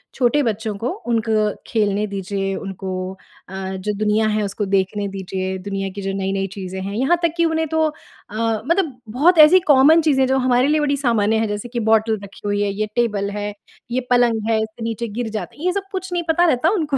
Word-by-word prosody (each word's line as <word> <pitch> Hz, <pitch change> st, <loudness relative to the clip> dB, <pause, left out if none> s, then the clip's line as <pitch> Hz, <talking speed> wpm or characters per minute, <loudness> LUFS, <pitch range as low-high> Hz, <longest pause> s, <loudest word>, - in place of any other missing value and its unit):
छोटे 265 Hz, +3 st, +2 dB
बच्चों 220 Hz, -2 st, -2 dB
को, 230 Hz, +5 st, -2 dB, 0.2 s
उनको 220 Hz, -2 st, +1 dB
खेलने 210 Hz, -2 st, +1 dB
दीजिए, 195 Hz, 0 st, -3 dB
उनको 190 Hz, -1 st, -6 dB, 0.6 s
अ, -, -, -10 dB, 0.2 s
जो 210 Hz, +3 st, -3 dB
दुनिया 215 Hz, +1 st, +2 dB
है, 215 Hz, 0 st, 0 dB
उसको 200 Hz, +1 st, -3 dB
देखने 195 Hz, +1 st, 0 dB
दीजिए, 190 Hz, -1 st, -4 dB
दुनिया 195 Hz, -1 st, -2 dB
की 200 Hz, -, -5 dB
जो 195 Hz, 0 st, -2 dB
नई-नई 195 Hz, 0 st, -1 dB
चीज़ें 190 Hz, -1 st, -5 dB
हैं। 200 Hz, +2 st, -4 dB
यहाँ 270 Hz, +9 st, +2 dB
तक 335 Hz, -2 st, +2 dB
कि 335 Hz, -, +3 dB
उन्हें 320 Hz, 0 st, 0 dB
तो 320 Hz, +1 st, +1 dB
अ, 305 Hz, -8 st, -13 dB, 0.3 s
मतलब 325 Hz, -5 st, 0 dB
बहुत 310 Hz, +10 st, +3 dB
ऐसी 370 Hz, +4 st, +6 dB
कॉमन 290 Hz, +5 st, +6 dB
चीज़ें 295 Hz, -4 st, +2 dB
हैं, -, -, +2 dB
जो 265 Hz, -, +3 dB
हमारे 255 Hz, 0 st, +3 dB
लिए 305 Hz, 0 st, +2 dB
बड़ी 285 Hz, -1 st, +1 dB
सामान्य 225 Hz, -5 st, +2 dB
हैं, 220 Hz, 0 st, +1 dB
जैसे 210 Hz, +3 st, -4 dB
कि 240 Hz, 0 st, -3 dB
बॉटल 220 Hz, -1 st, +3 dB
रखी 200 Hz, 0 st, -12 dB
हुई 205 Hz, 0 st, 0 dB
है, 205 Hz, -, +1 dB
ये 215 Hz, +2 st, -2 dB
टेबल 210 Hz, -4 st, 0 dB
है, 205 Hz, 0 st, -3 dB, 0.4 s
ये 255 Hz, +2 st, 0 dB
पलंग 230 Hz, -3 st, +2 dB
है, 225 Hz, -, +3 dB
इससे 220 Hz, +1 st, -8 dB
नीचे 230 Hz, +1 st, -3 dB
गिर 240 Hz, -2 st, -2 dB
जाते 215 Hz, 0 st, -6 dB
हैं। 310 Hz, -, -6 dB
ये 365 Hz, -, +3 dB
सब 400 Hz, 0 st, -2 dB
कुछ 375 Hz, 0 st, -4 dB
नहीं 345 Hz, -, 0 dB
पता 345 Hz, +2 st, +4 dB
रहता 315 Hz, 0 st, +3 dB
उनको। 310 Hz, -8 st, 0 dB
220 Hz, 220 wpm, -20 LUFS, 200-280 Hz, 0.6 s, ऐसी